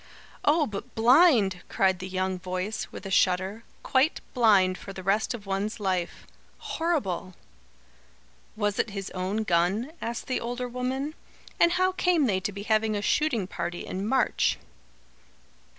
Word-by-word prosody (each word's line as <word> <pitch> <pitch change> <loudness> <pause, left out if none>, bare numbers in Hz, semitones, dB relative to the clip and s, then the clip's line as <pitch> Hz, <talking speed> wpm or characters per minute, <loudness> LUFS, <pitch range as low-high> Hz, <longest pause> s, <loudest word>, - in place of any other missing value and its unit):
"Oh, 300 +1 +4
but 205 -6 -7
blind!" 230 - +5
cried 190 -2 +2
the 185 - -5
young 185 0 -2
voice, 185 +4 -3
with - - -9
a 195 - -5
shudder. 190 +4 +1 0.2
"Quite 270 +3 +2
blind 200 -7 +4
for 195 - -9
the 190 - -8
rest 205 +5 +1
of 210 -4 -10
one's 195 +3 -2
life. 185 -4 -2 0.3
Horrible!" 200 - -2 1.2
"Was 205 -1 -1
it - - +1
his 195 -1 -6
own 190 +4 -2
gun?" 190 - +1
asked 235 0 -4
the 255 - -1
older 245 +1 -3
woman. 255 +4 -3 0.5
"And 340 0 +5
how 370 +1 +2
came 360 -5 +2
they 195 -6 +1
to 205 +2 -3
be 200 0 -7
having 215 0 +1
a 205 - -1
shooting 265 -9 +1
party 175 -2 -5
in 190 +2 -4
March?" 260 +1 +2
210 Hz, 150 wpm, -27 LUFS, 190-250 Hz, 1.2 s, blind